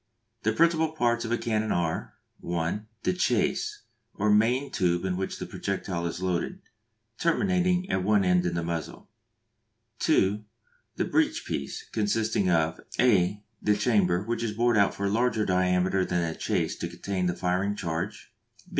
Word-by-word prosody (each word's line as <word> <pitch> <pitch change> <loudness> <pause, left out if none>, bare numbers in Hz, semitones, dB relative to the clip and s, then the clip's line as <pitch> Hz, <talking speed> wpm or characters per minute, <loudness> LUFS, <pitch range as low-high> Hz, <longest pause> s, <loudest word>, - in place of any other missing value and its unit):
The 110 - +1
principal 160 +4 +2
parts 120 -5 +1
of 115 - -4
a 120 - +2
cannon 110 -2 -1
are: 85 -2 -1 0.2
(1) 85 +5 -2 0.2
The - - +2
chase, 415 - 0 0.3
or 105 +1 +1
main 120 +6 +3
tube 90 -2 +1
into 95 -1 0
which 95 - -3
the - - -5
projectile 95 -3 -3
is 90 +2 -5
loaded; 95 - -1 0.6
terminating 180 +1 +2
at 95 - 0
one 100 -1 +3
end 90 0 +3
in 85 - -2
the 85 - -1
muzzle. 85 -2 -5 0.9
(2) 105 - +2 0.5
The - - 0
breech - - +1
piece, - - -4
consisting 110 -2 +1
of 80 -2 +1 0.2
(a) 100 -4 +3 0.2
the 105 0 +2
chamber, 100 -5 +2
which 115 +2 -2
is 115 -2 -2
bored 120 +2 +2
out 100 -2 +3
for 100 - -3
a - - +2
larger 115 -1 +1
diameter 90 0 +2
than 90 -2 0
the 80 - -4
chase - - -1
to - - -3
contain 95 -2 -2
the 90 - -1
firing 95 +3 0
charge. 85 +2 -4
100 Hz, 165 wpm, -27 LUFS, 90-115 Hz, 0.9 s, main